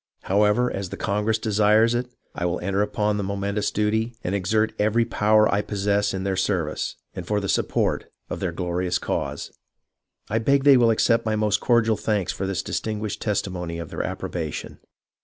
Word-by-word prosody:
However, 105 +5 +2
as 95 -2 -4
the 100 - -6
congress 105 +2 0
desires 110 +1 +3
it, 120 +1 -1 0.2
I - - -4
will 90 0 -1
enter 100 +2 0
upon 105 0 0
the 100 - -2
momentous 100 +1 -1
duty, 110 +3 0
and 90 - -2
exert 110 +3 +1
every 110 +3 +2
power 110 -1 +3
I 100 - +2
possess 100 0 0
in 95 0 -3
their 95 -1 -1
service, 95 -5 -1 0.2
and 90 -3 -7
for 105 -1 +1
the 100 - -3
support - - 0 0.2
of - - -5
their 90 - -1
glori 90 +1 -2
ous 90 0 +1
cause. - - -3 0.8
I 110 - 0
beg 140 +4 +2
they 140 -1 +7
will 120 -2 +5
accept 115 +1 +3
my 110 -1 0
most 105 -1 +1
cordial 115 -3 +2
thanks 105 -4 -1
for 95 - -3
this 95 -1 -2
distinguished 105 -1 -3
testimony 90 -5 -2
of 85 -2 -7
their - - -3
approbation. - - -5
105 Hz, 185 wpm, -24 LUFS, 95-110 Hz, 0.8 s, they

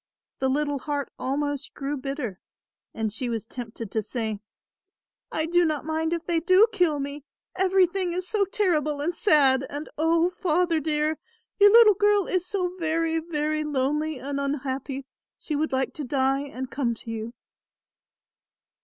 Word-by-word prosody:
The 265 - +1
little 290 +1 0
heart 285 0 -3
almost 285 +1 -2
grew 280 +1 -3
bitter 270 -7 -4 0.5
and 220 -2 -3
she 245 +2 -3
was 225 -2 -3
tempted 230 -3 -7
to 220 - 0
say; 220 -1 -3 0.9
"I 315 - -1
do 350 +2 +3
not 310 -3 -1
mind 320 +1 -1
if 340 -1 -2
they 340 -2 +1
do 370 +5 +6
kill 355 -8 +2
me, 280 +1 -5 0.3
everything 375 -1 +2
is 365 +1 -3
so 425 0 +1
terrible 315 -7 0
and 320 +5 -1
sad 290 - +4
and, 290 +2 -6
O 330 +2 +3
Father 350 -2 +1
dear, 305 0 0 0.4
your 410 0 +8
little 445 -1 +8
girl 410 0 +3
is 365 -1 -1
so 365 -3 -2
very 325 0 0
very 310 -1 -1
lonely 300 +1 -1
and 280 +2 -4
unhappy 275 -1 -3 0.3
she 305 - -4
would 310 +2 0
like 265 0 0
to 300 - -5
die 270 +1 +1
and 260 -2 -6
come 235 -2 -1
to 225 - -9
you." 225 +1 -5
300 Hz, 160 wpm, -26 LUFS, 270-340 Hz, 0.9 s, your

